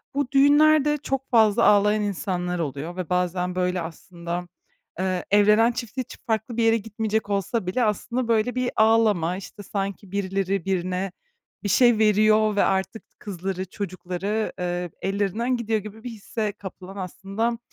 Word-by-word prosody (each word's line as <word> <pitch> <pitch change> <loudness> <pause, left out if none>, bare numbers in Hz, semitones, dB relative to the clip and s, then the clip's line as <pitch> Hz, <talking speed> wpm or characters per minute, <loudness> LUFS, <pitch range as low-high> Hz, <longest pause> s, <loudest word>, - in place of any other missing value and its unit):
bu 280 -3 -1
düğünlerde 295 +1 +5
çok 270 -2 -3
fazla 220 -1 +4
ağlayan 210 +1 +4
insanlar 180 -3 -2
oluyor 155 +2 -4
ve 185 -3 -4
bazen, 180 0 0
böyle, 180 -1 0
aslında, 170 +1 -6 0.5
eee, 185 -1 -1
evlenen 210 +3 +5
çift 235 0 -7
için 255 -2 -5
farklı 225 +1 -1
bir 230 - +2
yere 225 0 +4
gitmeyecek 220 0 -2
olsa 200 +1 -1
bile 245 +7 +1
aslında, 235 +3 -1
böyle, 230 +2 +1
bir 255 -1 0
ağlama, 215 -6 +3
işte, 205 +1 -10
sanki 195 -1 -4
"Birileri 195 -1 -1
birine 185 0 -1 0.5
bir 205 - -1
şey 240 +2 +5
veriyor 215 0 +4
ve 205 - +3
artık 195 +3 -1
tı - - -43
kızları, 190 -1 -4
çocukları, 195 +2 -3
ııı, 175 -1 -2
ellerinden 205 +6 0
gidiyor." 225 -2 0
gibi 215 +2 -10
bir 245 - -5
hisse 215 -1 -4
kapılan 190 0 -10
aslında, 200 +5 -3
205 Hz, 150 wpm, -24 LUFS, 185-225 Hz, 0.5 s, düğünlerde